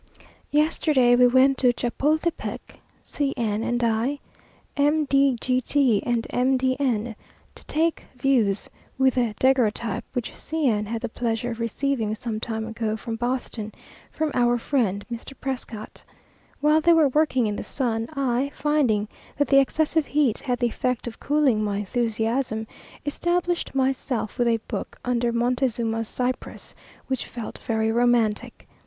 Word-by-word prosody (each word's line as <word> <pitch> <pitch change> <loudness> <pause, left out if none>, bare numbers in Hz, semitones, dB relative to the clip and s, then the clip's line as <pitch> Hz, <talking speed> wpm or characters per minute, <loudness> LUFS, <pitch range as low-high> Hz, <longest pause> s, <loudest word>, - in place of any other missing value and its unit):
Yesterday 295 -4 +3
we 250 0 +6
went 260 +2 +4
to 250 -2 +5
Chapultepec, 300 +8 -2 0.2
C 280 -2 -2
n 220 -3 0
and 240 +1 -1
I, 230 +5 +1 0.6
M. 295 +2 +2
de 275 -1 +3
G 255 +1 +1
t, 255 -6 +2
and 235 -1 0
M. 260 +2 +2
de 255 0 +1
N, 235 -4 0 0.4
to - - -13
take 325 +2 0
views 240 -7 +2 0.3
with 265 -1 +4
the 240 -4 0
Daguerreotype, 235 -3 +1
which 245 -3 -3
C 315 -2 -2
n 210 -3 +1
had 225 +1 -3
the - - 0
pleasure 235 +1 -2
of 230 - -6
receiving 230 -1 -1
some 220 0 -4
time 220 0 -3
ago 225 -1 -2
from 225 +1 -5
Boston, 240 -2 -3 0.4
from 315 -1 -2
our 240 0 +3
friend, 225 -6 0
Mr. 235 +4 -7
Prescott. 240 -5 -6 0.6
While 305 +1 +4
they 340 +2 +5
were 315 -4 +5
working 265 -4 +2
in 210 -1 -1
the - - -4
sun, 230 -4 -2
I, 270 0 0
finding 260 -9 +1 0.3
that 290 - +1
the 275 - +7
excessive 310 +2 +1
heat 280 -6 +1
had 250 -3 -1
the 245 - 0
effect 250 +1 -2
of 235 -2 -7
cooling 280 -7 +2
my 205 -1 -1
enthusiasm, 225 +2 -1 0.4
established 345 +2 -1
myself 260 -4 -1
with 240 - +3
a 230 -1 +3
book - - -5
under 240 -1 +1
Montezuma's 235 -2 0
cypress, 250 +2 -4 0.3
which 260 -2 -3
felt 235 -2 -7
very 220 -1 0
romantic. 235 -1 +1
245 Hz, 150 wpm, -24 LUFS, 225-275 Hz, 0.6 s, the